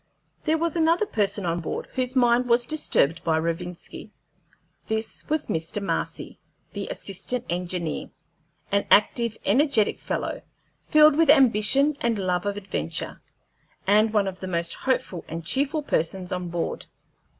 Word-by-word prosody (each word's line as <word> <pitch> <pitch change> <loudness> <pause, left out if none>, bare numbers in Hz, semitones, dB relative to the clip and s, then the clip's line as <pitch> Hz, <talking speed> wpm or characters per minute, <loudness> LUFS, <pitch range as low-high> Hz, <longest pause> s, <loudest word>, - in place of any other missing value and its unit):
There 315 0 +2
was 335 +1 -1
another 335 +4 +3
person 205 - -1
on 170 0 0
board 165 - -4
whose 255 0 -2
mind 245 0 +3
was 235 +1 +4
disturbed 235 - +1
by 160 -1 +2
Rovinski. 170 +2 -4 0.8
This 220 0 -3
was 310 0 0
Mr. 160 +5 -2
Marcy, 200 - -3 0.3
the - - -4
Assistant 200 +6 -5
Engineer, 175 -2 -3 0.6
an 200 0 +1
active, 230 +2 +3
energetic 240 -1 +2
fellow, - - -3 0.4
filled 305 -1 +5
with 325 -1 +3
ambition 270 +1 +5
and 235 -2 +1
love 180 -1 -1
of 205 0 -2
adventure, 180 - -4 0.6
and 210 +2 +4
one 205 -2 +2
of 185 -1 -5
the 185 - -6
most 170 -2 -1
hopeful 225 -9 -2
and 165 +1 -6
cheerful 285 - 0
persons 180 - -1
on 180 -1 -3
board. 170 0 -3
210 Hz, 140 wpm, -25 LUFS, 180-265 Hz, 0.8 s, filled